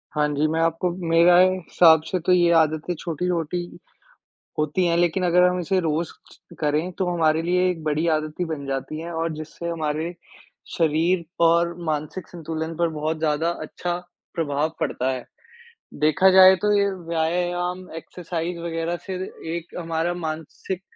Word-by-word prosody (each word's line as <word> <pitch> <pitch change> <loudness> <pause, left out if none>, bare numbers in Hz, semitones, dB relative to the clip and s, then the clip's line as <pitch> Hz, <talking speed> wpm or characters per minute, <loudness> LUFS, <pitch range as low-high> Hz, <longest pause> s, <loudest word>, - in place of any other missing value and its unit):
हाँ 150 0 +2
जी, 145 +2 +1
मैं 160 +1 -1
आपको 165 +2 +1 0.2
मेरा 170 +2 +6
ए 185 - +6
हिसाब 165 -3 +5
से 180 +3 -2
तो - - +3
ये 175 -1 +4
आदतें 155 +2 0
छोटी-छोटी 175 0 -2 1.0
होती 150 +4 +1
हैं, 170 0 +2
लेकिन 175 +2 +1
अगर 180 +1 +4
हम 180 0 +2
इसे 190 +2 0
रोज 165 0 0 0.3
ज - - -18
करें 155 +4 0
तो 185 - 0
हमारे 160 -2 +2
लिए 180 +2 +2
एक 170 -3 -5
बड़ी 155 +2 0
आदत 155 0 -4
ही 180 - +2
बन 155 -4 -5
जाती 135 +3 -4
हैं 170 +1 -6
और 165 0 -2
जिससे 155 +2 -7
हमारे 160 +1 -2 0.6
शरीर 165 +2 +2 0.2
और 170 +1 +3
मानसिक 155 +3 -3
संतुलन 160 -1 -5
पर 170 0 +1
बहुत 155 0 -3
ज़्यादा 155 +1 +1
अच्छा 175 -1 -4 0.4
प्रभाव 155 -1 -1
पड़ता 130 +1 -1
है। 130 -2 -5 0.8
देखा 190 +5 +5
जाए 190 0 +8
तो 210 0 +3
ये 200 0 +3 0.2
व्यायाम, 175 +2 -1
एक्सरसाइज़ 170 +1 -5
वग़ैरह 170 0 -3
से 190 - -4 0.4
एक 170 0 -8
हमारा 165 0 -1
मानसिक 165 +2 -5
165 Hz, 160 wpm, -23 LUFS, 155-175 Hz, 1.0 s, जाए